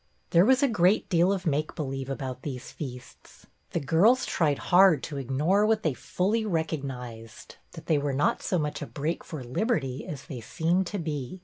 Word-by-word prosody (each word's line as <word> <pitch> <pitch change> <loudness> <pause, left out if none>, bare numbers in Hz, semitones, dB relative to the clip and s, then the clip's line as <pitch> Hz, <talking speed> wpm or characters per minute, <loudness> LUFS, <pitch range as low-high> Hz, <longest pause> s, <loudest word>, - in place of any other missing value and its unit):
There 170 +2 +6
was 265 +4 +4
a - - +5
great 195 -3 +2
deal 175 +1 +3
of 195 -1 -2
make 155 -1 -1
believe 135 -3 -4
about 130 -2 -5
these 130 -3 -6
feasts. 125 -4 -10 0.2
The - - -1
girls 190 - +3
tried 150 -4 +1
hard 180 -5 +5
to 145 - -5
ignore 145 - +1
what 220 -1 +1
they 155 - +1
fully 205 - -1
recognized, 135 - -5
— - - -41
that - - -10
they 155 -3 +2
were 145 0 -1
not 135 +2 +1
so 185 - 0
much 150 -2 -2
a 145 - -4
break 155 +4 -3
for 155 -7 -7
liberty 135 - -1
as 140 -3 -7
they 130 -7 -7
seemed 170 +9 0
to 205 - -4
be. 155 -1 -4
155 Hz, 195 wpm, -27 LUFS, 135-185 Hz, 0.2 s, There